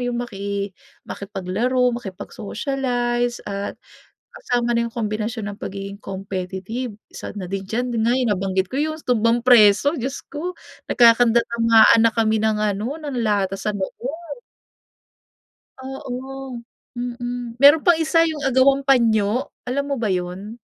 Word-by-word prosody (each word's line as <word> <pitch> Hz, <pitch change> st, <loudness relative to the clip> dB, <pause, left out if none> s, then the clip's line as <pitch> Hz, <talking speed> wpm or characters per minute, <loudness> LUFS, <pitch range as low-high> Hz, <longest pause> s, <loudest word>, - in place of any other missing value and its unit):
yung 240 Hz, -, -2 dB
maki 200 Hz, -2 st, -4 dB, 0.3 s
makipaglaro, 215 Hz, +6 st, -1 dB
makipag-socialize 240 Hz, +3 st, -3 dB
at 200 Hz, 0 st, -4 dB, 0.5 s
kasama 245 Hz, -, -1 dB
na 235 Hz, -, +1 dB
yung 230 Hz, -, -9 dB
kombinasyon 215 Hz, -1 st, -3 dB
ng 200 Hz, -, -10 dB
pagiging 200 Hz, +1 st, -6 dB
competitive. 195 Hz, +4 st, -5 dB, 0.2 s
Isa -, -, -8 dB
na 185 Hz, -3 st, -6 dB
din 195 Hz, -1 st, -4 dB
diyan, 245 Hz, +4 st, -2 dB
yun -, -, +1 dB
nga, 240 Hz, -, +3 dB, 0.2 s
nabanggit 190 Hz, -1 st, -1 dB
ko 270 Hz, -, -3 dB
yung 310 Hz, +1 st, 0 dB
tumbang 230 Hz, -1 st, +2 dB
preso, 235 Hz, +1 st, +6 dB
diyos 265 Hz, +3 st, -4 dB
ko, 345 Hz, +5 st, -4 dB, 0.3 s
nagkakandarapaan 230 Hz, -1 st, +5 dB
na 230 Hz, 0 st, +5 dB
kami 220 Hz, -1 st, +2 dB
ng 220 Hz, 0 st, +1 dB
ano, 210 Hz, +6 st, -1 dB
ng 290 Hz, -5 st, -5 dB
lata 195 Hz, -2 st, 0 dB
sa 210 Hz, +1 st, -2 dB
loob. 285 Hz, -, -6 dB, 1.4 s
Oo. 265 Hz, -1 st, -7 dB, 0.3 s
Mm, 245 Hz, 0 st, -5 dB
meron 290 Hz, +3 st, +7 dB
pang 345 Hz, -2 st, +4 dB
isa, 330 Hz, +1 st, +3 dB
yung 320 Hz, -2 st, -1 dB
agawang 270 Hz, +2 st, +3 dB
panyo, 230 Hz, -1 st, +2 dB, 0.2 s
alam 280 Hz, +3 st, -1 dB
mo 275 Hz, -, -1 dB
ba 225 Hz, -, -1 dB
yun? 185 Hz, +3 st, -3 dB
235 Hz, 135 wpm, -22 LUFS, 205-255 Hz, 1.4 s, meron